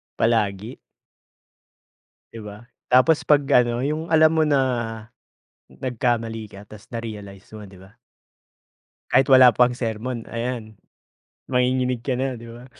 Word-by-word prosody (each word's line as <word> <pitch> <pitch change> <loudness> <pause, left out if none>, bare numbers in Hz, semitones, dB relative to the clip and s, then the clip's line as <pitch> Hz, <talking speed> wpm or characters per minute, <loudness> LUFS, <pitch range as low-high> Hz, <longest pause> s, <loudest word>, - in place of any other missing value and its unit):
Palagi. 110 0 -1 1.5
'Di 115 - -10
ba, 105 0 -10 0.3
tapos 140 +5 +4
'pag 145 -1 +3 0.2
ano, 120 0 -3
yung 155 +5 -3
alam 155 0 +5
mo 160 - +3
na 145 -2 +2 1.1
nagkamali 115 -3 -3
ka 100 +1 -13
tas 105 -2 -14
narealize 105 -4 -8
mo, 105 - -9
'di 95 -2 -14
ba? 95 +1 -17 1.2
Kahit 130 +1 +4
wala 130 -3 +7
pang 125 0 +4
sermon, 115 0 -5
ayan, 115 -2 -5 0.7
manginginig 125 -1 0
ka 130 -3 -2
na 135 0 -2
'di 115 0 -11
ba. 120 +2 -12
120 Hz, 125 wpm, -22 LUFS, 110-130 Hz, 1.5 s, wala